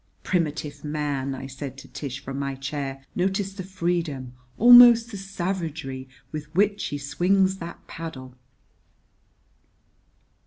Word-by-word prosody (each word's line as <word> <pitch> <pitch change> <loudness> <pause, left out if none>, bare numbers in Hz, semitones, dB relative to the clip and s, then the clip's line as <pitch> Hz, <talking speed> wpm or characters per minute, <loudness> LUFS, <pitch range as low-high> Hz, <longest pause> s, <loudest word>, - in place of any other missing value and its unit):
"Primitive 155 -4 -2
man!" 145 -3 -2
I 135 - -7
said 135 0 -7
to 135 - -11
Tish, 140 -1 -6
from 135 0 -5
my 140 -1 -2
chair. 135 0 -5
"Notice 195 +2 0
the 195 - -6
freedom, 170 -8 -2 0.2
almost 240 0 +9
the 205 - -6
savagery, 165 -8 -4 0.2
with 150 -1 -5
which 205 +2 +2
he 145 - -3
swings 190 +7 +2
that 170 -1 -9
paddle." 135 -6 -8
155 Hz, 120 wpm, -25 LUFS, 135-190 Hz, 0.2 s, almost